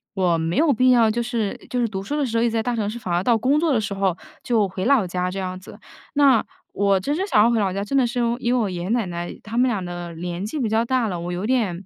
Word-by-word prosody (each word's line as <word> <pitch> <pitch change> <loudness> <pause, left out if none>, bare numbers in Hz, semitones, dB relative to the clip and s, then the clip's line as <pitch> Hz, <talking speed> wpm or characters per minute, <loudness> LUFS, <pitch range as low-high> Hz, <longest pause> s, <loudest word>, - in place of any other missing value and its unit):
我 180 -3 +2
没 165 +2 -2
有 310 -2 +4
必 255 +3 +3
要， 230 -3 +5
就 235 +2 -1
是 230 -4 -2
就 250 - -1
是 235 - +2
读 195 -2 -5
书 295 +9 -3
的 285 - +1
时 230 -2 -2
候 230 - +2
一 - - +3
直 - - -1
在 225 -1 0
大 245 0 -1
城 210 -2 -1
市， 235 - -6
反 180 -5 -4
而 175 +2 +1
到 235 -2 +3
工 270 +6 +2
作 325 -2 +1
的 225 - +2
时 205 -1 -3
候， 190 -3 0 0.3
就 220 -5 +2
回 185 +1 -4
老 255 -7 +4
家 180 +1 -2
这 195 - -4
样 185 -1 -4
子。 190 - -13 0.4
那 275 -5 +5 0.3
我 200 -1 +2
真 285 +10 -2
是 380 +3 -1
想 210 - +4
要 235 - +4
回 230 - +2
老 195 -2 +1
家 200 +1 -2
真 275 +7 -1
的 255 - +4
是 245 +1 -3
因 235 - +2
为 - - -4
因 240 +1 +1
为 - - +2
我 205 - 0
爷 175 -1 -5
爷 185 - -4
奶 230 -3 +1
奶 175 0 -5
他 225 +2 -6
们 255 +1 +4
俩 200 -5 -2
的 175 -1 -6
年 175 +2 -5
纪 290 +8 -4
比 235 - 0
较 220 +1 +2
大 255 -2 +1
了， 180 -3 -3
我 175 +1 -4
有 180 +4 -3
点 205 -8 0
215 Hz, 350 characters per minute, -22 LUFS, 185-245 Hz, 0.4 s, 要